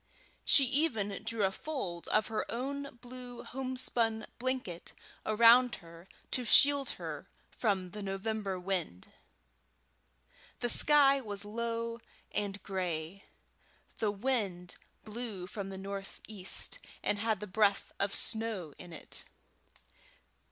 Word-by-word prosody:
She 280 - +6
even 240 -8 0
drew 225 -1 -1
a 190 - +3
fold 195 - -5
of 215 0 +3
her 220 - -2
own 275 +2 -4
blue 245 -1 -9
homespun 245 -4 -1
blanket 250 -9 -3 0.3
around 235 +3 +7
her 170 0 -14 0.2
to 250 - +1
shield 280 +4 +6
her - - -6 0.2
from 190 -5 0
the 210 - -6
November 195 0 -2
wind. 180 - -3 1.5
The 240 - -1
sky 275 0 +7
was 205 -3 -5
low 230 +1 -3 0.3
and 200 -1 -2
gray; 180 -1 -3 0.7
the 215 - +2
wind 200 -5 -2 0.3
blew 215 -4 -5
from 200 0 -5
the 190 - -6
northeast, 195 0 -3 0.2
and 205 - +1
had 220 -2 0
the 210 - -5
breath 200 0 +2
of 200 0 +1
snow 220 -9 0
in 175 - -10
it. 160 - -7
215 Hz, 115 wpm, -32 LUFS, 195-245 Hz, 1.5 s, around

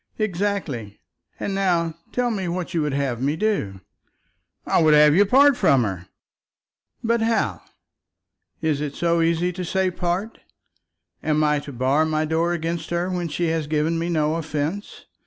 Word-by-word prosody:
"Exactly. 180 - -2 0.4
And 200 - -3
now 175 -4 +1 0.2
tell 245 -1 0
me 195 -4 -2
what 175 +1 -4
you 165 - +1
would 150 -2 -1
have 135 -4 -1
me 140 +3 0
do." 160 - -1 0.8
"I - - +2
would 155 -1 +5
have 150 0 +6
you 200 +4 +4
part 275 +5 +6
from 135 - +3
her." 95 -4 -4 1.0
"But 230 0 +1
how? 225 0 0 1.0
It 150 -2 0
is 145 -1 -4
so 170 -1 +1
easy 170 +2 +1
to 180 +1 -5
say, 190 +1 0
part. 180 +5 -3 0.8
Am 155 0 +1
I 150 -1 +2
to 145 - -9
bar 130 +4 +1
my 155 0 0
door 165 +2 0
against 165 -1 -3
her 175 +2 -1
when 175 -1 -2
she 165 +2 -1
has 160 -2 -1
given 155 +2 0
me 170 +1 -2
no 155 -1 +1
offence? 155 +5 -4
165 Hz, 165 wpm, -23 LUFS, 150-185 Hz, 1.0 s, have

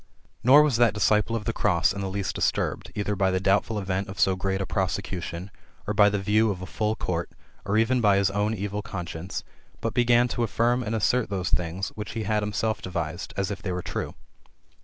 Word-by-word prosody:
Nor 140 +5 +8
was 145 -6 +2
that 120 -3 +4
disable 105 +2 +2
of 110 -2 -3
the 115 - -1
cross*^ 90 -6 +2
in 100 - -5
the 95 - -2
least 100 -1 -2
disturbed, - - -1
either 105 0 -1
by 95 0 +2
the 95 0 +1
doubtful 100 +3 +1
event 95 -1 -2
of 95 - -8
so 95 - +4
great 95 +1 -1
a 95 - -1
prosecution, 95 -1 -3 0.3
or 105 - -1
by 105 0 +6
the 105 - -1
view 105 +3 +2
of 95 -3 -2
a 90 - -6
full 110 +3 -1
court, 85 -4 -2 0.4
or 100 +1 +1
even 120 +3 +3
by 100 -3 +4
his 100 -1 +2
own 105 +2 0
evil 105 +1 -3
conscience, 90 -3 -5 0.4
but - - -2
began 120 0 +4
to 120 - -2
affirm 120 +2 +1
and 110 -1 -2
assert 115 +2 +1
those 95 -3 -2
things 90 +2 -1
which 105 0 -7
he 115 - -3
had 105 +1 +1
himself 105 +1 -1
devised, 85 -2 -4
as 100 0 -1
if 100 -2 -5
they 95 - -3
were 90 -1 -3
true. - - -4
100 Hz, 220 wpm, -26 LUFS, 95-110 Hz, 0.4 s, Nor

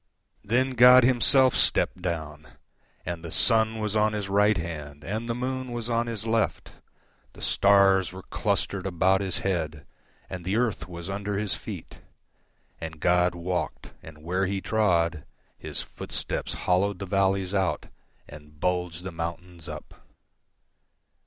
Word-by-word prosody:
Then 125 +5 +1
God 125 0 +8
himself 130 +1 +5
stepped 90 - +2
down—And 80 0 -7
the 85 - -6
sun 110 +4 +2
was 105 -1 -2
on 110 0 +2
His 105 -2 -3
right 105 +1 +3
hand, 75 -4 -6
And 110 +5 -4
the 115 - -1
moon 130 0 -3
was 120 0 -3
on 115 0 +1
His 115 -2 -4
left; 115 -1 -1 0.6
The - - -14
stars 100 -2 +4
were 95 0 -10
clustered 100 -1 -1
about 95 +2 +2
His 95 -2 -3
head, 80 -5 -2 0.4
And 90 -1 -7
the 95 +4 -1
earth 110 -7 0
was 85 -1 -8
under 100 +1 -3
His 105 -1 -1
feet. - - -8 0.8
And 80 -1 -7
God 90 +1 +2
walked, 90 +1 -4
and 75 -1 -13
where 90 +3 0
He 100 +1 -2
trodHis 85 -7 -2
footsteps - - -4
hollowed 95 +2 +2
the 95 - -5
valleys 95 0 +1
outAnd 75 -4 -5
bulged 90 -1 -1
the 95 - -5
mountains 85 0 -6
up. - - -8
95 Hz, 140 wpm, -26 LUFS, 85-110 Hz, 0.8 s, God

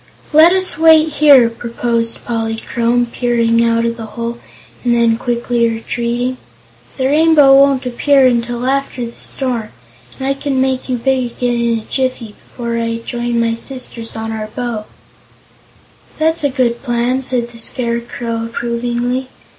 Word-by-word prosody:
"Let 320 +3 +7
us 375 -4 +1
wait 320 -1 +6
here," 285 -5 +6
proposed 230 0 -3
Polychrome, 235 +1 -1
peering 235 -2 +1
out 230 0 +1
of 230 0 -2
the 225 -1 -7
hole 235 0 -4 0.4
and 240 -1 +2
then 230 -1 +3
quickly 240 -1 0
retreating. 240 +2 -2 0.6
"The 260 - -1
Rainbow 295 -1 +5
won't 275 -1 +4
appear 270 +2 +3
until 240 0 0
after 270 -2 -1
the 230 - -7
storm 245 -5 -2 0.5
and 265 - -4
I 275 - +2
can 275 -1 -2
make 260 0 -1
you 250 - 0
big 255 0 0
again 245 -1 -1
in 235 -1 +1
a 220 - -7
jiffy, 255 -3 -2
before 235 -1 -4
I 230 0 -2
join 240 -1 -2
my 230 0 +1
sisters 230 -1 -6
on 225 0 -4
our 215 -1 -4
bow." 225 -1 -4 1.3
"That's 320 0 +1
a 285 - +2
good 250 -3 0
plan," 245 +1 0
said 250 -2 -1
the 230 - -12
Scarecrow 235 -1 -2
approvingly. 240 +2 -2
240 Hz, 150 wpm, -16 LUFS, 230-265 Hz, 1.3 s, Let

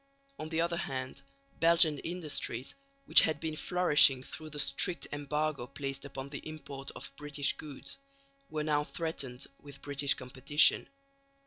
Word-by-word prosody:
On 155 - -5
the 165 0 0
other 170 0 0
hand, 130 -4 -5 0.4
Belgian 165 -3 +5
industries, 155 -7 -2 0.3
which - - +7
had 155 -2 0
been 155 0 -3
flourishing 150 -7 +4
through 155 +3 -9
the 150 - -9
strict 160 +5 +3
embargo 145 -2 -2
placed 135 +1 -5
upon 140 -1 -7
the 140 -1 -6
import 145 -3 -8
of - - -8
British 145 -1 0
goods, 150 - -8 0.5
were 155 -1 -3
now 150 -1 +1
threatened 140 -6 -4
with 140 -1 -13
British 140 -1 +2
competition. 130 +4 +3
145 Hz, 140 wpm, -31 LUFS, 140-155 Hz, 0.5 s, which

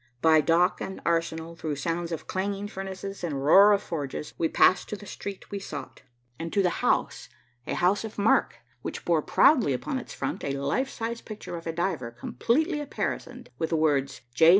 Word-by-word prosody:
By 160 +2 +5
dock 170 +4 +3
and 190 - -5
arsenal, 165 0 -1
through 155 -2 -3
sounds 165 +4 -2
of 165 - -4
clanging 200 +1 -2
furnaces 195 -1 -6
and 140 -5 -2
roar 200 +7 +8
of 205 0 +3
forges, 150 -2 -4
we 165 - 0
passed 185 - +4
to - - -3
the 205 - -11
street 200 0 -7
we 200 - -3
sought 195 - -8 0.4
and 165 0 -4
to 200 - +3
the 180 - 0
house, - - 0 0.4
a - - -1
house 185 +4 +2
of 220 -1 -7
mark 205 +2 +3 0.3
which - - -6
bore - - +3
proudly 245 - +4
upon 260 - -2
its 245 - -10
front 135 - -3
a 140 - -1
life 140 - 0
size 230 -2 -4
picture 215 -5 -7
of 165 0 -7
a - - 0
diver 165 -7 -2
completely 290 - 0
apparisoned, 290 - -4
with 160 - 0
the 165 - +1
words 140 -3 +1
"J. 160 +6 +6
175 Hz, 195 wpm, -27 LUFS, 160-205 Hz, 0.4 s, roar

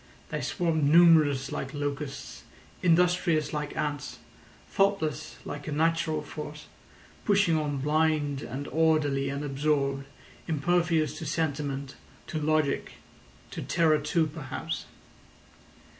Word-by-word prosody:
They - - -3
swarmed 165 -5 0
numerous 155 -4 +5
like 135 -1 -4
locusts, 145 -1 -4 0.4
industrious 175 -2 +3
like 150 -1 -3
ants, 145 -2 -3 0.5
thoughtless 195 -7 0
like 145 +1 -6
a - - -3
natural 160 0 +1
force, 150 0 -8 0.6
pushing 200 -5 +3
on 150 -2 -1
blind 150 -1 +1
and 135 +3 -5
orderly 155 -4 +2
and 140 +1 -3
absorbed, 140 -1 0 0.4
impervious 165 0 +1
to 160 - -5
sentiment, 140 -3 -2 0.3
to 155 - -3
logic, 155 -2 +1 0.6
to - - -5
terror 160 -2 +3
too 160 +2 +1
perhaps. 150 -3 -5
150 Hz, 110 wpm, -28 LUFS, 145-160 Hz, 0.6 s, numerous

